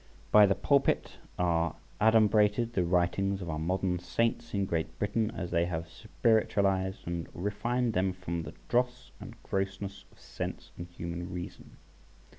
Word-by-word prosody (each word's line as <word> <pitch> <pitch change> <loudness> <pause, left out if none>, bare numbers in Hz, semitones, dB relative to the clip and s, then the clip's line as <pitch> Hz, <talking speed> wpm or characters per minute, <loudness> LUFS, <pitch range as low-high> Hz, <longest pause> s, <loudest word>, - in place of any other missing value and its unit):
By 105 -1 +8
the 100 - +2
Pulpit 140 -1 +1 0.2
are 85 -2 +1 0.3
adumbrated 110 +1 +4
the 90 - +2
writings 90 +3 +1
of 90 -4 -4
our 75 - -3
modern 90 +2 0
saints 115 +6 -1
in 100 -1 0
Great 80 -3 -2
Britain, 105 +2 0
as 90 -5 -5
they 85 -1 +2
have 85 -1 -3
spiritualised 95 -1 +1
and 85 -1 -3
refined 115 +5 -1
them 95 0 +1
from 90 -2 -4
the 80 +1 -8
dross 125 +1 0
and - - -9
grossness 95 0 -3
of - - -23
sense - - -6
and 85 - -7
human 85 0 -6
reason. 90 -1 -8
95 Hz, 150 wpm, -30 LUFS, 85-105 Hz, 0.3 s, By